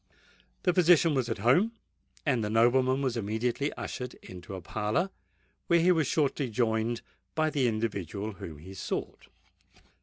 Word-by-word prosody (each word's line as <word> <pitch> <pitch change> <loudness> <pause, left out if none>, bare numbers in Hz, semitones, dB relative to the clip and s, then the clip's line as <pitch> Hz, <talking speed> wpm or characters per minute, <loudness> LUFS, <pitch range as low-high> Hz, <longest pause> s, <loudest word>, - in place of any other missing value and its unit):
The 180 - +3
physician 170 -2 +5
was 130 -3 0
at 115 - -1
home; 135 - +3 0.5
and 125 -5 +2
the 105 - -1
nobleman 130 +4 +3
was 130 -3 0
immediately 115 +6 -1
ushered 125 -2 -5
into 90 +1 -9
a - - -5
parlour, 110 - -1 0.6
where 170 - +5
he 175 +2 +5
was 160 -5 +2
shortly 140 -3 +1
joined 115 0 0 0.3
by 155 0 +2
the 135 -4 +2
individual 110 -2 -2
whom 85 -5 -9
he 90 +6 -11
sought. - - -5
120 Hz, 150 wpm, -29 LUFS, 110-145 Hz, 0.6 s, physician